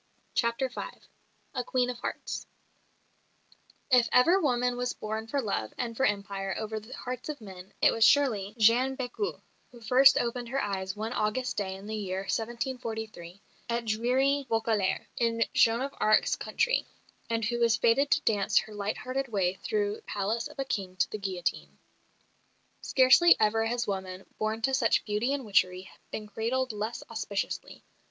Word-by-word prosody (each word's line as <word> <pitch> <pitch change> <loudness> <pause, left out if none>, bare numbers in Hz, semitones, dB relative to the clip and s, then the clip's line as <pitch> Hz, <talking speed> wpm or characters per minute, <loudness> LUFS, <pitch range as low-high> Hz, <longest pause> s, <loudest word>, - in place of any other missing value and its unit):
CHAPTER 235 +3 +1
V 255 - -6 0.7
A 250 - -2
QUEEN 250 0 0
OF 245 - -9
HEARTS - - -5 1.4
If 250 -2 +5
ever 340 +10 +5
woman 250 -4 +1
was 245 0 -2
born 220 +1 -5
for 280 +5 -1
love 155 - -2
and 235 -2 -3
for 265 - +3
empire 200 -1 -2
over 220 0 -3
the 215 +4 -15
hearts 250 +3 -6
of 300 - -4
men 190 -3 -11
it - - +7
was 225 - +1
surely 220 -7 +3
Jeanne 245 +4 +4
Bécu, 260 - -3 0.3
who 240 - -14
first 260 +4 +6
opened 240 0 -2
her 270 +2 -1
eyes 190 -3 -2
one 220 +3 -4
August 230 +4 -1
day 190 -2 -2
in 195 +1 -11
the 220 +1 -4
year 190 -3 -3
1743, 220 -4 -4 0.3
at 235 0 -1
dreary 260 +5 +1
Vaucouleurs, 220 -4 0
in 230 -1 +2
Joan 230 +1 +4
of 275 +1 -3
Arc's 215 0 +3
country, - - 0 0.4
and 230 -1 0
who 240 +2 -1
was 230 -2 +3
fated 270 +5 +3
to - - +3
dance 205 -3 +1
her 215 - +1
light 205 0 -3
hearted 270 +2 -3
way 195 -6 0
through 420 -1 0
the - - -17
palace 215 - -2
of 300 0 -15
a 270 - -2
King 190 -7 -3
to - - 0
the 215 - -4
guillotine. 185 -3 -3 1.0
Scarcely 270 +7 +6
ever 225 +1 +2
has 240 +1 -1
woman, 190 -1 -4
born 220 +1 -2
to 265 - +1
such 245 -3 +2
beauty 215 +5 0
and 280 -3 -2
witchery, 185 -2 +1 0.2
been 215 - -5
cradled 235 +4 -1
less 215 +2 -4
auspiciously. 215 -3 -4
230 Hz, 170 wpm, -29 LUFS, 210-255 Hz, 1.4 s, it